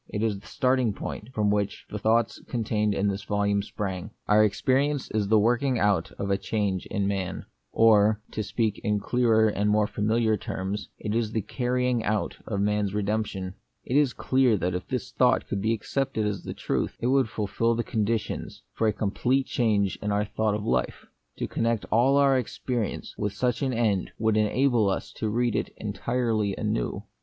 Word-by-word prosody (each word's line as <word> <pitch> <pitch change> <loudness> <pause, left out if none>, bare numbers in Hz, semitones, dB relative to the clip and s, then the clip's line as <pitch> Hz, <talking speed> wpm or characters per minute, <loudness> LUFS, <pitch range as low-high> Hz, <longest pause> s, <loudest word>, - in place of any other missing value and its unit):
It 105 - -2
is 105 -3 0
the 100 - -16
starting 125 -4 +1
point 105 +3 -6
from 105 -4 +1
which 105 -1 -1
the 105 - -4
thoughts 110 +2 +1
contained 105 -3 0
in 100 - +1
this 100 0 -2
volume 100 0 +1
sprang: 100 -1 -4
— - - -45
Our 105 +1 +5
experience 135 +6 +1
is 105 -2 0
the 110 +2 +4
working 120 +4 +2
out 100 -6 +1
of 100 0 -3
a 100 - +1
change 100 -4 -1
in 100 -2 -1
man; 95 -2 -3 0.3
or, 110 -1 +5
to 110 - -3
speak 110 -1 -1
in 105 -1 +1
clearer 110 0 +3
and 105 0 0
more 105 0 +3
familiar 110 +1 +1
terms, 95 +2 -4
it 105 - -3
is 115 -1 0
the 110 - 0
carrying 125 0 0
out 105 0 -1
of 100 -3 -1
man's 105 -1 0
redemption. 100 -3 -2 0.3
It 125 - -2
is 145 -3 +4
clear 130 -4 +2
that 90 -1 -1
if 90 +1 -4
this 130 -1 -3
thought 125 -1 +2
could 100 - -2
be 110 +2 +1
accepted 115 +1 -1
as 105 -3 -3
the - - -5
truth, - - -2
it - - -3
would 130 -2 +3
fulfil 115 +3 0
the 120 - -1
conditions 110 -1 -2
for 115 - +1
a 105 - +2
complete 125 +6 0
change 105 -7 +1
in 105 - -1
our 105 +1 +1
thought 110 0 0
of 105 - -4
life. 65 0 -1 0.3
To - - -2
connect 115 -2 -1
all 130 +5 +4
our 135 -2 +4
experi 120 -1 -3
ence - - -8
with 105 -1 -1
such 125 0 -1
an 135 -2 +1
end 110 -6 0
would 110 -1 +1
enable 110 0 +3
us 95 - -3
to 110 - -1
read 120 0 +1
it - - -1
entirely 110 0 -1
anew. - - -2
110 Hz, 195 wpm, -26 LUFS, 100-120 Hz, 0.3 s, Our